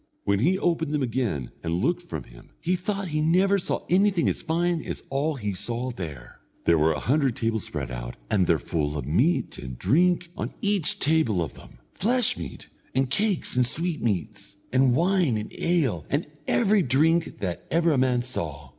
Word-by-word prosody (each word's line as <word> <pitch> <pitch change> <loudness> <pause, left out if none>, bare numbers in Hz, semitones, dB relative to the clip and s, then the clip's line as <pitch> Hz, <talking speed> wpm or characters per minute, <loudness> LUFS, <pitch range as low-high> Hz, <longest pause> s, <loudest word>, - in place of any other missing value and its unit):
When 100 0 +1
he 175 - +3
opened 165 -5 0
them 145 - 0
again 115 - -2
and 85 0 -1
looked 90 - +1
from - - -6
him - - -16
he 180 +2 0
thought 195 +1 -3
he 155 0 0
never 190 +5 +3
saw - - -2
anything 190 -1 +3
as - - 0
fine 170 +1 0
as - - -5
all 145 +3 0
he 105 -6 -3
saw 120 +6 -3
there. 75 - -8 0.3
There 85 -1 +4
were 80 +1 +4
a 75 - -2
hundred 135 -2 +1
tables 110 -3 -1
spread - - -5
out, - - -6
and 95 - +2
their 85 - +4
full 75 +2 -2
of 70 - -4
meat 120 - +1
and 65 -1 -7
drink 175 - +2
on - - -5
each 200 -6 +1
table 145 - +2
of 80 - -6
them, - - -15 0.2
flesh 245 +3 +2
meat, 85 -5 -8 0.3
and 130 0 +1
cakes 200 -1 0
and 125 - +4
sweetmeats, 120 - -1 0.2
and 130 -1 +4
wine 170 - +2
and 105 - -6
ale, 140 - +1
and 145 +4 0 0.2
every 210 -3 +3
drink 160 +4 +2
that 90 -3 -4
ever 170 +1 +3
a 145 - +2
man 125 -2 +2
saw. 75 - -5
135 Hz, 190 wpm, -26 LUFS, -, 0.3 s, There